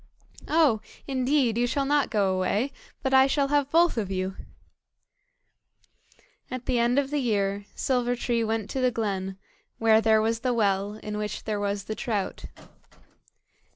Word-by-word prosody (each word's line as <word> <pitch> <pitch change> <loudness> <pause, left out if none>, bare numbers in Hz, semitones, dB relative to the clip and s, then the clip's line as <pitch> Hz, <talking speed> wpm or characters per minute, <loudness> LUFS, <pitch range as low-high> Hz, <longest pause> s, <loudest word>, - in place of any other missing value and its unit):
"Oh! 300 -9 +3 0.2
indeed 260 -3 +1
you 245 - +2
shall 275 +3 0
not 290 0 +2
go 200 -3 +1
away, 205 +8 0 0.3
but 265 -1 0
I 265 0 +7
shall 275 0 +1
have 290 -1 +2
both 335 -4 +3
of 200 -4 -3
you." 190 0 -2 2.1
At 255 -1 -6
the 250 -2 +1
end 240 +2 +2
of 280 0 +1
the 295 - 0
year, 200 -5 0
Silver 245 -2 0
tree 235 -1 0
went 220 -2 -1
to 265 - -2
the 255 - +4
glen, 195 -5 -3 0.4
where 220 -1 +4
there 220 -1 +4
was 225 +1 0
the 250 0 0
well, 200 -2 +1
in 210 0 -4
which 210 0 -4
there 215 -2 -2
was 200 0 -2
the 215 - -4
trout. 215 -4 -3
230 Hz, 160 wpm, -26 LUFS, 205-265 Hz, 2.1 s, I